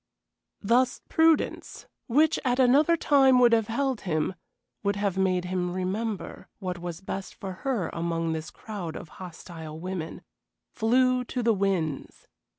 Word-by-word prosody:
Thus 245 Hz, +4 st, +3 dB
prudence, 320 Hz, -1 st, +2 dB, 0.2 s
which 305 Hz, +6 st, +3 dB
at 250 Hz, -2 st, +1 dB
another 280 Hz, +6 st, +5 dB
time 270 Hz, -4 st, +5 dB
would 240 Hz, -1 st, +6 dB
have 225 Hz, -2 st, +3 dB
held 265 Hz, +1 st, -1 dB
him 155 Hz, 0 st, -1 dB, 0.5 s
would 200 Hz, -1 st, 0 dB
have 200 Hz, -2 st, -1 dB
made 185 Hz, -2 st, +1 dB
him 180 Hz, -1 st, -1 dB
remember 195 Hz, +4 st, -3 dB
what 180 Hz, -3 st, -4 dB
was 175 Hz, -1 st, -6 dB
best 190 Hz, 0 st, -6 dB
for 195 Hz, -, -6 dB
her 240 Hz, -11 st, -1 dB
among 165 Hz, -1 st, -1 dB
this 160 Hz, 0 st, -4 dB
crowd 195 Hz, -7 st, -7 dB
of 155 Hz, -, -8 dB
hostile 160 Hz, -3 st, -8 dB
women 180 Hz, -2 st, -5 dB, 0.5 s
flew 250 Hz, +2 st, +3 dB
to 245 Hz, 0 st, -3 dB
the 230 Hz, 0 st, +4 dB
winds. 190 Hz, -7 st, -2 dB
200 Hz, 145 wpm, -27 LUFS, 175-250 Hz, 0.5 s, would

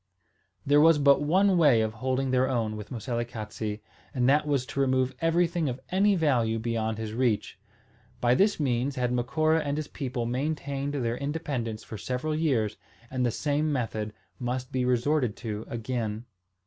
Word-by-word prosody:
There 145 Hz, +1 st, +5 dB
was 165 Hz, 0 st, +6 dB
but 140 Hz, -1 st, +5 dB
one 185 Hz, +5 st, +3 dB
way 145 Hz, -8 st, +6 dB
of 110 Hz, 0 st, -1 dB
holding 130 Hz, +3 st, -1 dB
their 130 Hz, 0 st, +2 dB
own 115 Hz, -4 st, -1 dB
with 105 Hz, -1 st, -8 dB
Moselekatse; 115 Hz, -3 st, -4 dB, 0.3 s
and 125 Hz, -1 st, +2 dB
that 150 Hz, +2 st, +3 dB
was 140 Hz, -3 st, +1 dB
to 140 Hz, -, -5 dB
remove 130 Hz, -1 st, +2 dB
everything 165 Hz, -1 st, +2 dB
of 125 Hz, +1 st, -4 dB
any 200 Hz, +2 st, +3 dB
value 125 Hz, -9 st, +2 dB
beyond 110 Hz, -1 st, -2 dB
his 110 Hz, -1 st, -5 dB
reach. 120 Hz, -3 st, 0 dB, 0.6 s
By 120 Hz, 0 st, +3 dB
this 200 Hz, +7 st, +3 dB
means 130 Hz, -1 st, 0 dB
had 125 Hz, -2 st, 0 dB
Macora 155 Hz, +6 st, +2 dB
and 145 Hz, 0 st, -2 dB
his 155 Hz, -, -3 dB
people 125 Hz, -3 st, -4 dB
maintained 140 Hz, +2 st, -2 dB
their 120 Hz, -3 st, -1 dB
independence 140 Hz, -7 st, -3 dB
for 110 Hz, -, -8 dB
several 130 Hz, +5 st, -2 dB
years, 125 Hz, -10 st, 0 dB, 0.3 s
and 130 Hz, -1 st, -1 dB
the 120 Hz, -, +3 dB
same 150 Hz, +5 st, 0 dB
method 110 Hz, -5 st, -2 dB, 0.3 s
must 125 Hz, +1 st, -3 dB
be 130 Hz, -1 st, 0 dB
resorted 125 Hz, -1 st, +1 dB
to 110 Hz, -2 st, -5 dB
again. 115 Hz, -1 st, -3 dB
130 Hz, 165 wpm, -27 LUFS, 115-145 Hz, 0.6 s, was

